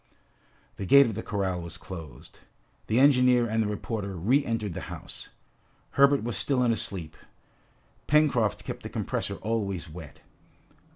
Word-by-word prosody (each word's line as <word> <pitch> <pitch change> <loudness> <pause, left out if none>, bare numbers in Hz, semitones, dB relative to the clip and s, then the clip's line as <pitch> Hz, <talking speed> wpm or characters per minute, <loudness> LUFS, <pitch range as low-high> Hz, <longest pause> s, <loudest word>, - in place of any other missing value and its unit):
The 100 - -5
gate 140 +4 +8
of 115 - -2
the 110 - -4
corral 95 -5 -2
was 85 0 -7
closed. 80 -7 -10 0.5
The 110 +3 +2
engineer 125 -3 +5
and 110 0 0
the 110 - 0
reporter 105 -1 -4
re 120 - +2
entered 115 -6 -2
the - - -7
house. - - -8 0.6
Herbert 140 -1 +4
was 120 -2 -3
still 125 +5 +1
in 120 - +3
a - - +2
sleep. 95 -10 -3 0.9
Pencroft 140 -8 +2
kept - - -6
the - - -7
compresses - - -3
always 100 -5 -2
wet. 80 -2 -11
110 Hz, 155 wpm, -27 LUFS, 95-125 Hz, 0.9 s, gate